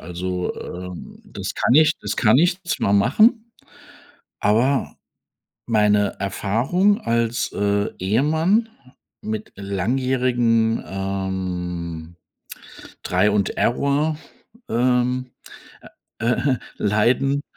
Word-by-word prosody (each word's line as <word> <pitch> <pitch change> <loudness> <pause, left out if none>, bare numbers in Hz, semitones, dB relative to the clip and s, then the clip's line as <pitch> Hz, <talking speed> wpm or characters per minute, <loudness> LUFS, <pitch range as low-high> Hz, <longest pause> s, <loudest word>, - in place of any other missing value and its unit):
Also, 90 +2 -4
ähm, 90 0 -8
das - - -6
kann 120 - +2
ich 155 +1 +6
das - - -4
kann 115 +1 +4
ich 175 +4 +2
zwar 115 - -1
machen, 220 - +3 0.9
aber 120 +7 +1 0.7
meine 105 -2 +2
Erfahrung 125 - +1
als, 115 0 -1
äh, 100 0 0
Ehemann 160 - +1 0.5
mit 110 0 -5
langjährigen, 115 +3 0
ähm, 90 -4 -4 0.9
try 90 +3 +2
und 100 -2 +1
Error 140 +5 +1 0.5
ähm, 125 +2 +1 0.9
äh, - - -5
äh, 130 +2 +1 0.2
Leiden 120 +7 +1
115 Hz, 90 wpm, -21 LUFS, 100-135 Hz, 0.9 s, ich